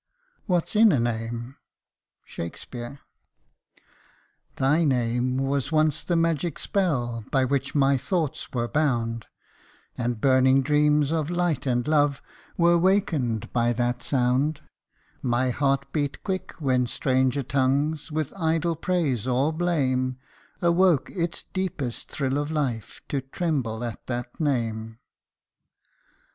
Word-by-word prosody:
What 175 -4 +1
's - - -7
in 220 0 +7
a 140 - +2
name 115 +2 -3 0.4
?" - - -54
SHAKSPEARE. 120 - -7 1.5
THY 150 +5 +2
name 125 -2 +1
was 135 +1 -1
once 155 -1 +2
the 175 - 0
magic 165 -1 0
spell, 125 - -1
by 135 -2 +2
which 140 +1 -1
my 135 -1 +3
thoughts 160 -2 -2
were 120 -2 -1
bound, 115 -6 0 0.7
And 120 -2 -2
burning 130 +1 +4
dreams 150 0 +3
of 160 -2 0
light 175 -5 0
and 125 +1 0
love 145 -2 +3 0.4
were 170 0 +4
wakened 160 - +1
by 120 -1 +2
that 120 +1 -1
sound; 135 +3 +1 0.6
My 125 +1 +1
heart 140 +1 0
beat 145 -3 -2
quick 185 -1 -3
when 130 -5 +1
stranger 130 +1 +1
tongues, 140 +4 0
with 155 -2 -2
idle 165 -1 0
praise 150 - -1
or 135 +5 +1
blame, 130 -7 0 0.5
Awoke 170 -3 +3
its 170 -3 -3
deepest 155 -10 -3
thrill 135 0 -1
of 145 0 -2
life, 135 -8 -3
to 140 - -1
tremble 135 -5 -2
at 115 -2 -6
that 120 -1 -5
name. 115 -6 -1
140 Hz, 125 wpm, -25 LUFS, 125-155 Hz, 1.5 s, in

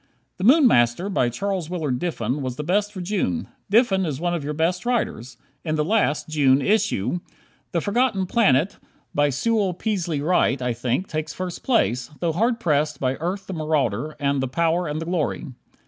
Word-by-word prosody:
"The 185 - -5
Moon 275 +7 +6
Master," 120 - +3
by 125 -11 +1
Charles 185 +4 -3
Willard 155 -8 -2
Diffin 150 -5 -2
was 130 -2 -3
the 150 - -4
best 205 +6 +1
for 190 -3 -7
June. 175 - -1 0.2
Diffin 205 -3 +3
is 150 -6 -3
one 175 +1 0
of 170 -4 -2
your 150 +1 -3
best 175 +4 0
writers. 130 - -2 0.3
In 155 -2 -1
the 150 -1 0
last 185 -6 +1
(July) 140 -3 +3
issue, 185 - +1 0.5
"The 170 -3 0
Forgotten 210 -1 +1
Planet," 185 - +2 0.3
by 145 0 +3
Sewell 200 - 0
Peaslee 180 -7 -2
Wright, 145 -5 +2
I 125 -1 -1
think, 125 +10 -1
takes 155 0 -4
first 185 -1 -5
place, 125 - +1
though 170 -2 0
hard 230 +7 +1
pressed 150 - 0
by 130 -1 +1
"Earth, 185 +4 -3
the 190 - -6
Marauder" 155 - -1
and 140 -1 +1
"The 130 - -1
Power 165 +5 +1
and 150 +1 -3
the 165 - -4
Glory." 170 -1 -1
165 Hz, 185 wpm, -23 LUFS, 140-195 Hz, 0.5 s, Moon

